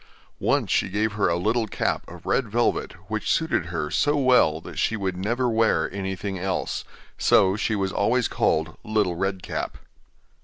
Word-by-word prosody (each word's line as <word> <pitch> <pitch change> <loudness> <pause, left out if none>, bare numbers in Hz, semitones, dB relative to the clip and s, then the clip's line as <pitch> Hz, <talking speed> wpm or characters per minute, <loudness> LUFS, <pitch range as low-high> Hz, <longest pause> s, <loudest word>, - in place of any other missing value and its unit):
Once - - +1
she - - +2
gave 105 +3 0
her 105 -1 +1
a 85 - +1
little 110 +6 0
cap - - -1
of 85 0 -12
red 125 -5 +1
velvet, 120 +3 0
which 110 +1 -2
suited 160 - +1
her 80 -3 -3
so 145 0 +2
well 125 - +4
that - - -8
she 115 - +1
would 95 -3 -2
never 120 +7 0
wear 115 -5 +2
anything 95 0 -4
else; 95 0 -2 0.4
so 95 0 +4
she 105 +1 0
was 95 -1 -1
always 120 +4 +2
called 80 +1 0
'Little 105 -5 0
Red 95 0 -2
Cap. - - -4
100 Hz, 170 wpm, -24 LUFS, 90-115 Hz, 0.4 s, well